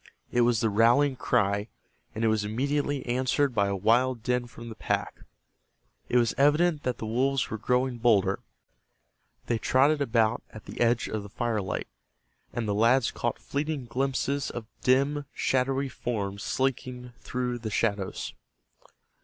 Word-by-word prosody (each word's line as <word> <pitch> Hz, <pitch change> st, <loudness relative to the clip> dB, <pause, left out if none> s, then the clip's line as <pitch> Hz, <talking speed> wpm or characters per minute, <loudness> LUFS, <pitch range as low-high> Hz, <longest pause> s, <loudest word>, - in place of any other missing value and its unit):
It 120 Hz, -, +3 dB
was 120 Hz, -2 st, +3 dB
the 115 Hz, -, +2 dB
rallying 120 Hz, +6 st, +4 dB
cry, 105 Hz, -4 st, +1 dB, 0.5 s
and 110 Hz, -, -2 dB
it -, -, +4 dB
was 110 Hz, -1 st, +2 dB
immediately 140 Hz, +5 st, -1 dB
answered 130 Hz, +2 st, +1 dB
by 100 Hz, -3 st, +2 dB
a 100 Hz, -, -1 dB
wild 115 Hz, +4 st, +2 dB
din 125 Hz, 0 st, 0 dB
from 115 Hz, 0 st, -10 dB
the 110 Hz, -, -8 dB
pack. -, -, -2 dB, 0.9 s
It 125 Hz, -, +3 dB
was 120 Hz, -2 st, +3 dB
evident 150 Hz, +3 st, +4 dB
that 125 Hz, -3 st, -2 dB
the -, -, -5 dB
wolves 130 Hz, +3 st, 0 dB
were 110 Hz, -, -2 dB
growing 125 Hz, +1 st, 0 dB
bolder. 115 Hz, -5 st, +3 dB, 1.1 s
They 115 Hz, -2 st, 0 dB
trotted 140 Hz, +6 st, +3 dB
about 115 Hz, -3 st, +2 dB
at 110 Hz, -, -12 dB
the -, -, -7 dB
edge 120 Hz, 0 st, +2 dB
of 110 Hz, -, -3 dB
the 100 Hz, -, -10 dB
firelight, 110 Hz, -3 st, -2 dB, 0.6 s
and 120 Hz, -2 st, -3 dB
the 105 Hz, -, +1 dB
lads 115 Hz, +4 st, +3 dB
caught 120 Hz, -, -2 dB
fleeting 145 Hz, -1 st, -3 dB
glimpses 135 Hz, +3 st, -1 dB
of 120 Hz, -2 st, -6 dB, 0.2 s
dim, 140 Hz, +3 st, +2 dB
shadowy 135 Hz, +1 st, +1 dB
forms 100 Hz, -6 st, -4 dB
slinking 125 Hz, -1 st, -2 dB
through 125 Hz, -1 st, -3 dB
the 110 Hz, -1 st, -4 dB
shadows. 100 Hz, -2 st, -1 dB
120 Hz, 155 wpm, -27 LUFS, 110-135 Hz, 1.1 s, rallying